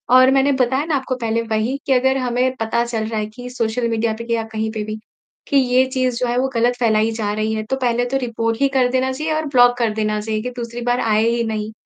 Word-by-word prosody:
और 255 0 +7
मैंने 270 +1 +3
बताया 260 +2 +1
ना 320 -2 0
आपको 260 -1 -2
पहले 230 0 0
वही 225 +3 -1
कि 270 - +2
अगर 265 +1 +2
हमें 250 0 0
पता 225 +1 0
चल 225 -2 -2
रहा 220 0 -2
है 210 - -1
कि 245 0 -8
सोशल 235 -1 -1
मीडिया 225 0 0
पे 230 - -6
या 230 -1 0
कहीं 220 0 -2
पे 215 -1 -4
भी 215 0 -5 0.5
कि 280 - +2
ये 255 -1 +4
चीज़ 255 -2 0
जो 250 - 0
है 240 +1 -1
वो 265 - +1
गलत 240 +1 +2
फैलाई 220 -2 +2
जा 220 -2 -2
रही 215 +1 -1
है। 215 - -2
तो 240 +5 -2
पहले 245 -1 +1
तो 270 - +1
रिपोर्ट 230 -3 -2
ही 280 - +5
कर 255 -2 +4
देना 260 +1 +1
चाहिए 310 +4 -2
और 310 0 -1
ब्लॉक 245 0 +6
कर 235 -2 +1
देना 215 -1 -1
चाहिए 215 0 -2
कि 250 - -4
दूसरी 235 0 -5
बार 245 +1 +2
आए 215 -1 +2
ही 235 0 0
नहीं 215 -1 -3
235 Hz, 265 wpm, -20 LUFS, 220-255 Hz, 0.5 s, और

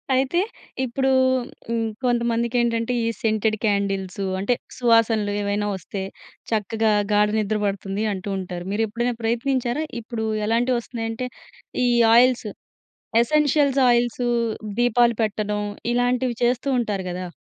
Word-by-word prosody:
అయితే 270 +7 +2 0.4
ఇప్పుడు 265 +2 0 0.6
హ్మ్, 230 -1 -1 0.2
కొంతమందికెంటంటే 235 0 +1
ఈ - - +1
సెంటెడ్ 220 0 +1
క్యాండిల్స్ 200 -2 -1 0.2
అంటే 200 +6 +1 0.2
సువాసనలు 230 -3 +3
ఏవైనా 205 +1 -1
వస్తే, 190 +2 -6 0.5
చక్కగా 220 0 +1 0.2
గాఢ 210 0 +4
నిద్ర 215 0 0
పడుతుంది 195 +1 -2
అంటూ 195 +1 -5
ఉంటారు. 180 -2 -5
మీరు 220 +2 +1
ఎప్పుడైనా 240 +3 -1
ప్రయత్నించారా? 245 +4 0 0.2
ఇప్పుడు 225 -1 -4 0.2
ఎలాంటివొస్తున్నాయంటే 235 0 -1 0.6
ఈ - - +3 0.3
ఆయిల్స్. 245 -1 +4 0.8
ఎసెన్షియల్స్ 285 0 +2
ఆయిల్సు 240 0 +1 0.5
దీపాలు 240 0 +4
పెట్టడం 210 -1 -1 0.3
ఇలాంటివి 245 0 +1
చేస్తూ 245 +3 +1
ఉంటారు 205 -5 -2
గదా! 180 +1 -4
230 Hz, 110 wpm, -23 LUFS, 210-245 Hz, 0.8 s, గాఢ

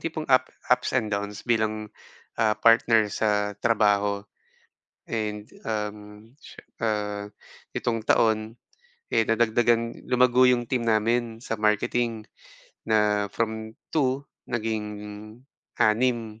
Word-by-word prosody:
tipong 160 -1 -4
up 130 -1 +4 0.2
ups - - +1
and 110 -4 -1
downs 100 +1 -4
bilang, 110 -2 0 0.5
ah, 110 -1 +3
partner 115 -1 +4
sa 105 -1 0
trabaho. 105 -3 +2 0.8
And, 105 -2 -3 0.2
um, 105 -1 -2 0.4
siye - - -14 0.2
ah, 105 -2 -1 0.5
itong 115 -2 -2
taon, 110 0 +2 0.6
eh, 115 - +3
nadagdagan 115 +1 +1
lumago 125 0 +4
yung 120 -2 +2
team 125 -3 -1
namin 115 +1 +1
sa 115 - -3
marketing 110 +1 0 0.6
na 105 -1 +2
from 110 -1 -3 0.2
2 140 -2 +1 0.2
naging 110 -3 -2 0.9
6. 115 -1 +1
110 Hz, 105 wpm, -25 LUFS, 105-120 Hz, 0.9 s, up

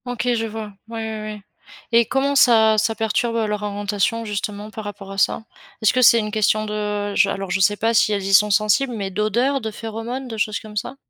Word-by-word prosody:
OK, 245 0 -1
je 225 -1 -1
vois, 215 -1 -7
ouais, 230 0 -7
ouais, 220 -1 -4
ouais, 215 -1 -7 0.5
et 235 0 +5
comment 275 +1 0
ça 220 -5 +5
ça 225 +1 0
perturbe 225 +1 -1
leur 210 -2 -1
orientation, 205 +2 -2
justement, 210 0 -5
par 220 - -7
rapport 200 -1 -8
à 195 - -4
ça? 220 - +1 0.4
Est-ce 215 - +4
que 255 - +2
c'est 235 -1 +7
une 210 -2 -1
question 215 0 +1
de 210 -1 -3
je - - +3
alors, 195 -2 -4
je 195 - 0
sais 205 +2 +3
pas 225 +3 +1
si 225 -1 +3
elles 200 -2 -1
y 195 - -1
sont 210 +2 +6
sensibles, 215 +6 +2
mais 195 -3 -4
d'odeurs, 235 +7 0
de 220 - -3
phéromones, 225 +4 -6
de 225 -2 -7
choses 215 0 -1
comme 215 -1 -12
ça? 240 +5 -4
215 Hz, 225 wpm, -21 LUFS, 205-230 Hz, 0.5 s, c'est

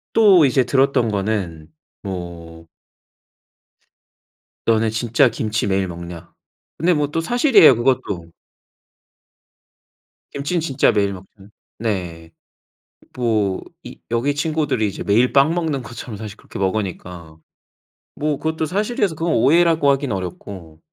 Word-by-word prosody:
또 200 -8 +6
이제 130 -1 +3
들었던 135 -3 +2
거는 95 -6 -3 0.3
뭐 85 -3 -8 2.0
"너네 115 -1 +2
진짜 120 +4 +2
김치 110 -2 -2
매일 95 -1 0
먹냐?" 85 0 -9 0.4
근데 175 +3 +2
뭐 150 -2 0
또 165 - -1
사실이에요 235 - +5
그것도. 115 -9 -1 2.0
김치는 150 +5 -2
진짜 140 -4 +2
매일 100 -2 0
먹 95 0 -10 0.5
네. 90 -7 -4 0.9
뭐 110 -6 0 0.2
이 - - -10
여기 125 +5 0
친구들이 145 -7 0
이제 100 - -6
매일 115 +5 +2
빵 140 +4 +4
먹는 160 -6 -2
것처럼 115 -1 -8
사실 105 0 -8
그렇게 - - -11
먹으니까. 90 -5 -4 0.8
뭐 150 -1 -1
그것도 160 0 -2
사실이라서 205 +1 -1
그건 165 +1 -1
오해라고 160 +4 +3
하긴 135 -2 -1
어렵고. 90 -3 -7
115 Hz, 250 characters per minute, -20 LUFS, 95-150 Hz, 2.0 s, 또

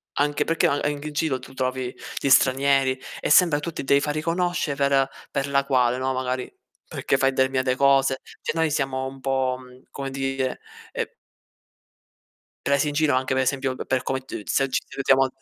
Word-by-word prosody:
anche 145 +1 +1
perché 165 0 +2
anche 145 0 0
an - - +1
eng 145 0 -8
in 155 - -5
giro 145 -3 0
tu 135 - -13
trovi 130 -1 -2 0.3
gli 140 - 0
stranieri 135 0 +4 0.2
e - - -1
sembra 165 -5 +6
tu 165 +3 -4
ti - - -5
devi 140 +1 +4
far 150 +1 -1
riconosce 170 -1 -1
per 140 -1 +2 0.2
per 140 0 -1
la 140 0 +2
quale, 125 -3 +2
no, 130 +1 -1
magari 130 0 -3 0.4
perché 135 - 0
fai 135 0 +2
determinate 130 -1 +1
cose, 135 0 +3 0.2
cioè - - -2
noi 165 -1 +2
siamo 135 -2 -1
un 135 0 -9
po' 130 -1 0 0.3
come 135 -1 -5
dire, 135 -1 -2 0.3
ehm - - -2 1.6
presi 140 +1 +2
in 145 - -2
giro 150 -1 +2
anche 130 0 0
per 130 0 +2
esempio 135 0 0
d - - -6
per 130 -1 0
come 130 - -1
d 130 -6 -8
se 135 -1 +1
ci - - +1
ci - - -29
salutiamo 135 -1 +3
135 Hz, 195 wpm, -24 LUFS, 130-140 Hz, 1.6 s, sembra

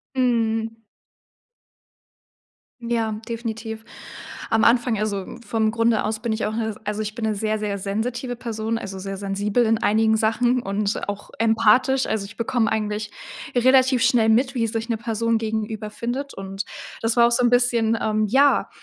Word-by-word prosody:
Mhm. 225 -3 0 2.0
Ja, 225 -2 -1
definitiv. 225 -1 -5 0.7
Am 225 0 +3
Anfang 235 -2 +3
also, 205 -2 -3
vom 220 -1 0
Grunde 230 -1 +2
aus 215 +1 -2
bin 230 -1 -2
ich 220 -1 -1
auch 215 - -3
'ne 225 -1 -1
s 215 - -5
also 210 +1 -2
ich 215 +2 -5
bin 230 - -4
'ne 215 -1 +1
sehr, 215 +1 -1
sehr 205 -1 -2
sensitive 235 +5 -3
Person, 225 -1 -3
also 195 -2 -7
sehr 195 0 -5
sensibel 200 +4 0
in 225 0 +2
einigen 220 +1 +3
Sachen 240 +3 +1
und 200 +1 -2
auch 205 0 -5
empathisch. 230 +4 +3
Also, 215 -2 -1
ich 215 +3 -11
bekomme 230 -1 0
eigentlich 210 -1 -2 0.5
relativ 260 0 +4
schnell 235 -2 +4
mit, 255 +4 +3
wie 230 -2 +1
sich 225 +1 -3
eine 230 - 0
Person 230 0 0
gegenüber 220 -1 -3
findet 255 +6 -4
und 195 0 -5 0.4
das 225 +1 0
war 235 0 +6
auch 240 - +1
so 235 - +2
'n 240 - +4
bisschen, 235 -2 +2
ähm, 215 0 +1
ja, 275 +5 +4
225 Hz, 170 wpm, -23 LUFS, 215-235 Hz, 2.0 s, war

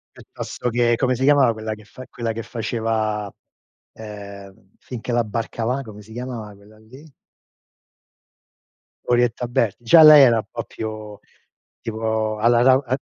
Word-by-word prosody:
Piuttosto 125 - -6
che 120 0 +2
come 130 +1 0
si 130 +1 -3
chiamava 140 -4 +4
quella 110 0 -5
che 110 - -12
fa 130 +5 -12
quella 115 -1 -4
che 115 - -5
faceva, 110 -3 -3 0.6
ehm, 100 -3 -11
"Fin 120 -3 -8
che - - -5
la 120 -1 +1
barca 115 +1 -4
va", 130 +3 -1
come 105 -4 -11
si 110 - -15
chiamava 120 -4 -7
quella 105 +2 -20
lì? 130 +7 -16 2.0
Orietta 120 0 +1
Berti. 120 -2 -1
Già 160 +8 +7
lei 150 -2 +10
era 120 -3 +5
un 110 - -3
po' 115 -1 -5
più, 110 -2 -8 0.6
tipo 110 -1 -2
alla 120 +2 +3
rau 130 +2 +4
eh 130 - 0
115 Hz, 155 wpm, -21 LUFS, 110-125 Hz, 2.0 s, lei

